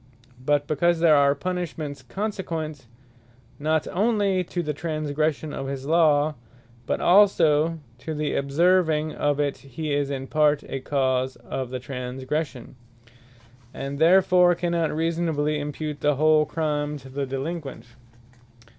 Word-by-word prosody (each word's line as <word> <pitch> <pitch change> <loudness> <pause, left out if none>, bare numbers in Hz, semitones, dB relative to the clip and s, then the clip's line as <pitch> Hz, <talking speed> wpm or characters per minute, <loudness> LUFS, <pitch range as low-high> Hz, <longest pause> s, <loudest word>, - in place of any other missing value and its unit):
But 145 +1 +2
because 165 +3 +1
there 165 -2 +5
are 140 0 +4
punishments 160 -6 -4
consequent, 160 - -4 0.7
not 155 +1 +1
onely 200 -2 +1
to 175 +1 -3
the 150 -1 -2
transgression 155 -1 -2
of 135 - -4
his 135 -1 -5
Law, 155 -1 +3 0.5
but - - 0
also 165 -5 +4 0.2
to 155 +5 -5
the 150 0 -2
observing 155 +1 +2
of 145 -1 0
it, 145 -1 0
he 145 +3 -5
is 140 -1 0
in 135 -1 -4
part 150 0 +2
a 135 - -5
cause 130 -1 0
of 130 -2 -5
the 130 - -4
transgression, 130 +1 -5 1.0
and 140 +1 -5
therefore 180 +1 +5
cannot 170 -2 0
reasonably 160 -2 0
impute 150 0 -5
the 150 -1 +2
whole 155 +1 +4
Crime 150 -2 -2
to 135 -1 -13
the 135 +1 -4
Delinquent. 135 -2 -5
150 Hz, 130 wpm, -24 LUFS, 140-165 Hz, 1.0 s, there